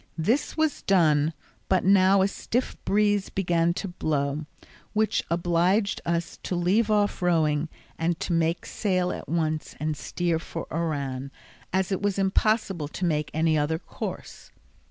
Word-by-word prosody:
This 230 - 0
was 315 -1 +1
done, 155 -5 +3 0.4
but 190 -2 +3
now 190 0 +5
a - - +3
stiff 245 +5 -2
breeze 205 0 +2
began 170 -3 +1
to 195 - -3
blow, 150 -4 -2 0.5
which 215 -1 +1
obliged 175 +4 +1
us 170 0 -2
to 180 - -3
leave 195 +6 +2
off 205 -2 +1
rowing 160 -3 +2 0.3
and 165 +1 0
make 165 0 +1
sail 185 -4 0
at - - -7
once 155 -2 -1
and 155 0 -1
steer 170 +2 -1
for 165 0 -6
Oran, 140 -5 -2 0.4
as 190 +1 0
it 190 - -1
was 205 -1 0
impossible 195 -4 +1
to 180 +4 -4
make 150 -3 0
any 160 0 +2
other 150 +2 0
course. - - -7
175 Hz, 145 wpm, -26 LUFS, 160-195 Hz, 0.5 s, now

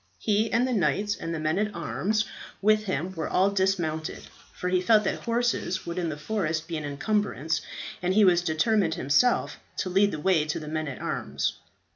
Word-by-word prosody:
He 215 +1 +1
and 240 +3 +2
the 255 - -1
knights 205 +2 +1
and 165 - -5
the 165 - -2
men 155 +4 0
at 210 0 -1
arms 210 +6 0 0.3
with 215 +1 +3
him 185 -1 -2
were 165 - -3
all 195 +2 +3
dismounted, 180 -5 -1 0.3
for 180 - -5
he 180 0 +2
felt 215 +3 +5
that - - -1
horses 235 -6 -1
would 170 +1 -3
in 170 -2 -1
the 150 - -4
forest 165 -2 -2
be 170 - -4
an 155 - -3
encumbrance, 160 +1 -1 0.4
and 180 +1 0
he 215 -1 +6
was 175 -2 +5
determined 175 +2 +1
himself 150 - +2 0.2
to 185 - -2
lead 200 +2 +4
the 155 - -4
way 170 -1 +3
to 155 0 -2
the 150 - -8
men 155 0 -2
at 135 - -6
arms. - - -2
185 Hz, 200 wpm, -27 LUFS, 160-210 Hz, 0.4 s, he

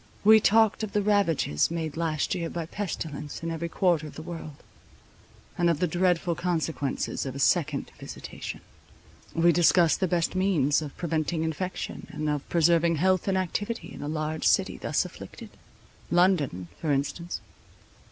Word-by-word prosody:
We 220 +1 +8
talked 220 +1 +4
of 215 -2 -4
the 210 - +2
ravages 195 - +2
made 160 -3 -3
last 160 -2 -1
year 170 -3 -2
by 170 -2 -4
pestilence 160 -6 -5
in 165 - -2
every 165 +1 -3
quarter 165 -3 +1
of - - -11
the 155 - -7
world; 160 -4 -8 1.0
and 175 -1 +4
of 165 - +2
the 180 - +2
dreadful 175 0 +1
consequences 160 -5 -2
of 135 -1 -5
a - - -5
second 125 -4 +1
visitation. - - -7 0.7
We 170 +1 +5
discussed 170 0 +4
the 185 - +1
best 170 -1 0
means 170 -7 +2
of 150 -3 -7
preventing 160 -1 -1
infection, 170 +3 -4
and 150 +1 -4
of 145 -1 -4
preserving 170 0 +3
health 185 +4 +2
and 190 -1 +2
activity 205 +5 -3
in - - -9
a 145 - -4
large 155 0 -1
city - - +2
thus - - 0
afflicted—London, 160 - -2
for 155 - -1
instance. 145 +5 -2
165 Hz, 155 wpm, -27 LUFS, 155-180 Hz, 1.0 s, We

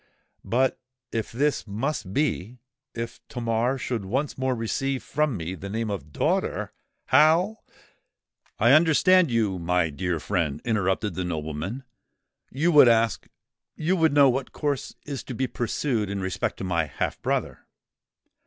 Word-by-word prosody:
But 130 +2 +1 0.3
if 115 -2 -3
this 140 +1 0
must 110 -1 -3
be—if 125 -1 -4
Tamar 120 +1 0
should 120 -5 -3
once 130 +9 -2
more 130 -1 0
receive 130 +4 -2
from 150 -6 0
me 85 +1 -4
the 95 +1 -7
name 110 +1 -2
of 75 -7 -6
DAUGHTER—how——" 170 - +1 1.0
"I 120 +3 +4
understand 170 +3 +5
you, 110 -6 0
my 85 -1 +1
dear 90 +2 -2
friend," 75 -5 -1
interrupted 105 -2 0
the 90 - -3
nobleman: 80 - -4 0.7
"you 160 +7 +1
would 145 -5 +8
ask—you 115 - -1
would 160 -4 +3
know 140 -1 +7
what 130 +1 -1
course 145 -3 -3
is 140 -4 -5
to 125 - -6
be 130 - 0
pursued 120 -3 -1
in 100 0 -3
respect 95 -1 -2
to - - -6
my 85 -3 0
half 70 - -3
brother." - - -2
115 Hz, 135 wpm, -25 LUFS, 95-135 Hz, 1.0 s, would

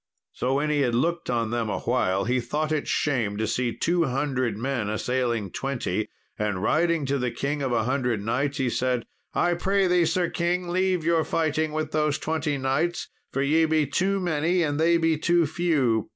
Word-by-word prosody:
So, 130 +2 -1
when 150 +2 +1
he 145 -1 +2
had 120 -3 +1
looked 170 +7 0
on 115 -2 0
them 115 -2 -1
awhile, 100 -5 0
he 125 +2 +1
thought 150 +5 -2
it 155 -2 -1
shame 120 -9 0
to 110 - 0
see 125 +1 0
two 170 +6 +1
hundred 130 -5 -1
men 120 -3 -2
assailing 115 -2 -1
twenty, 120 -7 -2 0.3
and 105 -3 -1
riding 165 +3 +2
to 140 +1 0
the 125 0 0
King 145 +4 -3
of 135 -2 -1
a 115 -2 +1
Hundred 125 -2 0
Knights, 135 +6 -1
he 130 - 0
said, 125 0 0 0.3
"I 175 0 +2
pray 195 +3 +1
thee, 180 -1 +3
Sir 175 +1 +1
king, 175 +1 -1
leave 185 -1 +1
your 165 0 +2
fighting 155 -1 0
with 155 0 -3
those 150 -1 +1
twenty 155 -2 -1
knights, 135 +6 -1 0.2
for 135 - 0
ye 160 +3 +3
be 155 -1 +2
too 190 +8 0
many 175 0 +1
and 145 -1 -1
they 170 +1 +4
be 165 -2 +1
too 170 +1 +3
few. 145 -8 +1
145 Hz, 195 wpm, -25 LUFS, 125-165 Hz, 0.3 s, they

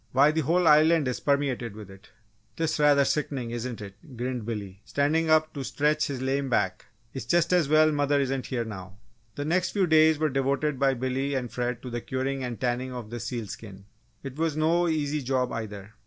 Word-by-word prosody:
Why, 140 +4 +5
the 160 +1 0
whole 170 +4 +2
Island 155 0 +5
is 125 - -2
permeated 135 -6 -1
with 105 -3 -10
it!" 95 0 -16 0.5
"'Tis 160 -1 -1
rather 145 -1 +5
sickenin', 135 -5 -2
isn't 120 -1 -5
it?" 105 +7 -11
grinned 125 -2 -3
Billy, 100 -4 -5
standing 155 +3 0
up 155 0 +3
to 140 - -5
stretch 150 +3 +1
his 130 -2 -4
lame 135 +1 -1
back. 95 -6 0 0.3
"It's 135 - -5
just 175 +1 +2
as 170 -6 +3
well 155 0 +5
mother 145 -1 +1
isn't 135 -1 -1
here 120 -3 -2
now!" 95 -3 -9 0.4
The 145 - -4
next 175 +4 0
few 195 -2 +2
days 160 -1 +5
were 155 0 +1
devoted 135 +1 0
by 135 -1 +3
Billy 130 +3 -2
and 125 -3 -3
Fred 125 -1 -3
to 125 - -6
the 120 0 -3
curing 130 +2 -3
and 120 -2 -5
tanning 125 +1 -1
of 120 -3 -7
the 120 - -5
seal 115 -1 -4
skin. 100 -1 -10 0.4
It 135 0 -7
was 160 -1 -1
no 170 +3 +2
easy 150 -2 -1
job, 130 -1 0
either! 105 -2 -6
135 Hz, 205 wpm, -27 LUFS, 120-150 Hz, 0.5 s, Why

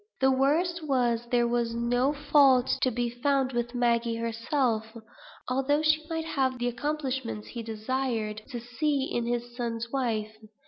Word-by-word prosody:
The 265 0 +4
worst 320 +7 +2
was, 240 -3 +1
there 240 -1 +3
was 235 -1 0
no 245 +3 +1
fault 285 -3 +4
to 255 - +3
be 240 0 -1
found 265 +2 0
with 240 +1 -2
Maggie 235 -1 +1
herself, 230 0 -1 0.5
although 270 +4 +1
she 310 0 +3
might 325 -1 -2
want 260 -2 +1
the 245 0 -1
accomplishments 265 -3 -3
he 235 - -5
desired 225 -1 -2
to 245 -4 -5
see 270 +4 -1
in 240 -3 -2
his 240 0 -3
son's 235 -1 -3
wife. 220 -5 -1
245 Hz, 150 wpm, -28 LUFS, 235-270 Hz, 0.5 s, The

